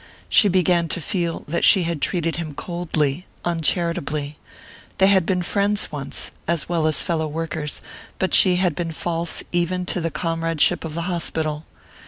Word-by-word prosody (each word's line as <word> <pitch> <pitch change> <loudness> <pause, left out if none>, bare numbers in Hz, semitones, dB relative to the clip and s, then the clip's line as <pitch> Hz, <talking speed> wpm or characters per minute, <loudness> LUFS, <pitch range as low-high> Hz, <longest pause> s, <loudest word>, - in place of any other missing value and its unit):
She 210 - +6
began 180 -2 +2
to 165 - -3
feel 170 0 -2
that 170 +3 -1
she 190 -3 +6
had 165 -3 -3
treated 165 -3 0
him 155 -4 -5
coldly, 160 -1 -2 0.2
uncharitably. 165 -3 -1 0.6
They 190 - +5
had 190 -3 +4
been 180 -2 +1
friends 200 +2 +1
once, 140 -2 -2 0.2
as 170 -3 0
well 165 -2 +1
as 155 - +1
fellow 160 -2 -1
workers; 155 -1 -4 0.3
but 190 - -1
she 185 -2 +6
had 180 -2 +1
been 165 +1 -4
false 170 +1 -1
even 180 +1 0
to 180 - -2
the 165 - -1
comradeship 165 +1 0
of 160 -2 -6
the 170 - -2
hospital. 160 -3 -2
170 Hz, 165 wpm, -22 LUFS, 155-180 Hz, 0.6 s, She